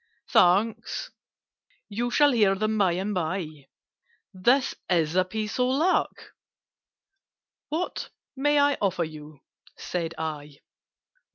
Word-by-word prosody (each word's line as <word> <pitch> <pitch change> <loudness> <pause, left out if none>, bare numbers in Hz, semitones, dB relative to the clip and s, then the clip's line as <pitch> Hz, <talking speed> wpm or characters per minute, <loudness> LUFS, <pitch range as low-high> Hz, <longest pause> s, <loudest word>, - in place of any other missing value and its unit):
"Thanks! 220 - +2 0.8
You 230 +4 -2
shall 290 +3 +4
hear 210 -6 +3
them 215 +2 -1
by 195 -5 +2
and 195 +4 -2
by. 160 -5 -4 0.7
This 245 +9 +2 0.2
is 165 -2 +1
a 185 - +4
piece 210 +5 -4
of 250 - +3
luck!" 305 +8 0 1.4
"What 335 +4 -3 0.3
may 290 +2 +2
I 285 0 +3
offer 190 -3 +1
you?" 155 -2 -10 0.4
said 170 -2 -4
I. 150 -2 -5
195 Hz, 110 wpm, -26 LUFS, 165-250 Hz, 1.4 s, shall